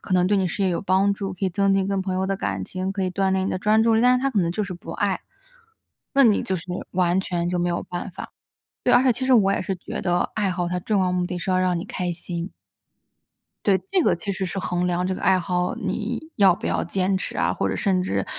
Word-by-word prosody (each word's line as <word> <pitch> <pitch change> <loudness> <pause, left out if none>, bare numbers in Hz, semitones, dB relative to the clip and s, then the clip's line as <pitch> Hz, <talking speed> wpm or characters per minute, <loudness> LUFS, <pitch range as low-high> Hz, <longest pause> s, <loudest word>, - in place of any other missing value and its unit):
可 185 - -2
能 180 0 +3
对 205 +1 +2
你 190 - +1
事 195 +3 -3
业 190 - +2
有 170 - -1
帮 195 +1 +2
助， 195 -2 -4
可 195 - -4
以 185 - +1
增 195 +2 +2
进 195 -1 +1
跟 195 -1 0
朋 190 -1 -2
友 190 +1 0
的 195 - 0
感 95 - -3
情， 185 - -4
可 195 -1 -2
以 185 - -1
锻 190 +1 0
炼 190 0 +1
你 - - -1
的 185 - -2
专 215 +3 +3
注 230 0 +3
力。 220 - +3
但 250 +1 +5
是 255 - -3
他 275 - +1
可 210 -6 +1
能 170 - 0
就 210 +4 -1
是 185 - -6
不 170 -1 -8
爱， 200 -2 -1 0.9
那 275 -1 +6
你 215 -3 +4
就 190 - -1
是 165 - -7 0.3
完 180 0 +2
全 175 -2 -2
就 180 0 -1
没 175 0 +1
有 170 - -1
办 180 +2 -5
法。 - - -9 0.5
对， - - +4
而 245 - +6
且 255 -2 +4
其 260 +3 -2
实 260 - +3
我 195 -3 +4
也 - - 0
是 190 - -2
觉 175 - -6
得 175 -1 0
爱 205 -3 0
好 175 -1 -2
它 180 0 -1
重 205 +2 0
要 180 - +1
目 180 -1 0
的 180 - -4
是 180 - -3
要 185 - +3
让 185 -1 +1
你 170 - -5
开 180 -1 -3
心。 170 +1 -5 1.2
对， 195 - +5
这 385 - +3
个 - - +3
其 200 +4 -3
实 190 0 -3
是 190 +2 -4
衡 180 0 -1
量 180 0 0
这 190 - -1
个 - - -5
爱 185 -1 +3
好， 180 0 -1
你 215 +5 -3 0.2
要 195 -3 +6
不 - - -5
要 - - 0
坚 190 +2 0
持 - - -5
啊， - - +1
或 - - -1
者 - - -1
甚 190 -3 +1
至 100 - -1
190 Hz, 305 characters per minute, -23 LUFS, 180-200 Hz, 1.2 s, 那